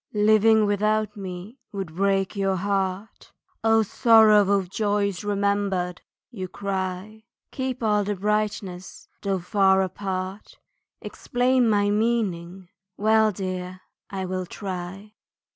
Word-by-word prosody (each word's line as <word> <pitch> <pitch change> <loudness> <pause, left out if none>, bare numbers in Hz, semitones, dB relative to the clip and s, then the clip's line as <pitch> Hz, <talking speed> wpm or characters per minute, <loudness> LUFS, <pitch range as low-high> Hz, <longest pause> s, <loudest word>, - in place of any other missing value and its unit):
Living 215 +1 +4
without 210 +1 0
me 195 +5 -8
would 195 -6 -5
break 195 +1 +1
your 195 -1 0
heart, 195 +2 -3 0.3
"O 225 0 +4
sorrow 215 -2 +5
of 190 -2 -3
joys 205 0 -1
remembered!" 200 -3 -1 0.3
You 190 -6 -5
cry, 195 +3 -5 0.3
Keep 260 -2 -4
all 210 -1 +2
the 205 +1 -2
brightness 200 -2 -3
though 195 -1 0
far 190 +1 +3
apart, 190 +1 -5 0.4
Explain 250 -1 +1
my 205 -1 +2
meaning 195 -5 -1 0.3
well 220 +1 +3
dear, 185 -1 -5 0.3
I 190 -1 -4
will 185 0 -3
try. 190 +2 -7
200 Hz, 110 wpm, -24 LUFS, 185-215 Hz, 0.4 s, sorrow